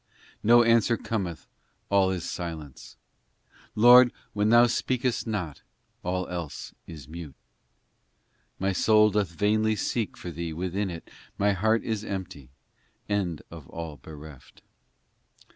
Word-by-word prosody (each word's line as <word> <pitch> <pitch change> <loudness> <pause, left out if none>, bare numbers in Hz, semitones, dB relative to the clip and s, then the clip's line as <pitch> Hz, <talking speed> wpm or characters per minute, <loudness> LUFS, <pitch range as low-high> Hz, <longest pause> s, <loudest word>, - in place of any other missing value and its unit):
no 120 +2 +6
answer 115 0 +3
cometh 95 -7 -4 0.5
all 100 -1 +4
is 90 -2 -3
silence! 80 -6 -7 0.8
Lord, 120 +2 +8 0.2
when 105 +1 +1
Thou 120 +1 +7
speakest 125 0 -1
not, 90 -10 -3 0.4
all 90 0 -2
else 85 -6 -6
is 75 -6 -10
mute! 80 -3 -9 1.2
My 95 +1 0
soul 105 +2 +4
doth 100 -3 0
vainly 110 +5 +1
seek 110 +1 -2
for 90 - -7
Thee 85 0 -5
within 95 +4 -2
it, 85 -2 -8 0.3
My 100 +1 +3
heart 110 +4 +1
is 110 -2 -2
empty, 95 - -6 0.6
and 95 -6 -1
of 80 -4 -11
all 80 -3 -7
bereft. 75 -1 -13
95 Hz, 125 wpm, -27 LUFS, 85-110 Hz, 1.2 s, Lord